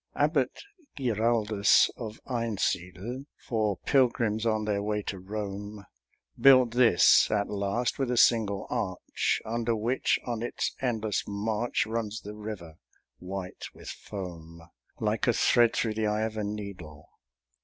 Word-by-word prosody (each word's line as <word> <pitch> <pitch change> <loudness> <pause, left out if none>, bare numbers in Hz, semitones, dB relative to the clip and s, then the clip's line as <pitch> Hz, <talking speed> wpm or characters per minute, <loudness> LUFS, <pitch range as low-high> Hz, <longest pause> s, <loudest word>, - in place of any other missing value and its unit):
Abbot 145 - +1 0.3
Giraldus 110 -4 +3
of 110 -2 -7
Einsiedel, 115 0 -2
For 110 -4 -1
pilgrims 115 -4 +2
on 110 -1 0
their 105 -1 0
way 105 0 -2
to 95 - -5
Rome, 100 +1 -6 0.5
Built 130 -3 +7
this 120 -7 +5
at 105 -1 0
last, 105 +6 -1
with 135 -2 0
a 125 - 0
single 105 -5 +3
arch, 95 -4 -1
Under 115 +1 -1
which, 115 +4 +1
on 120 -3 -3
its 120 - -2
endless 110 -5 -1
march, 105 +3 -1
Runs 110 -1 -3
the 105 - -8
river, 105 -7 -8 0.4
white 95 0 -6
with - - -10
foam, 85 -4 -8 0.4
Like - - 0
a - - +4
thread 120 -1 +4
through 110 -2 0
the 110 0 -1
eye 105 +1 0
of 110 0 -3
a 110 - -2
needle. 100 -8 -7
110 Hz, 135 wpm, -28 LUFS, 100-115 Hz, 0.5 s, Built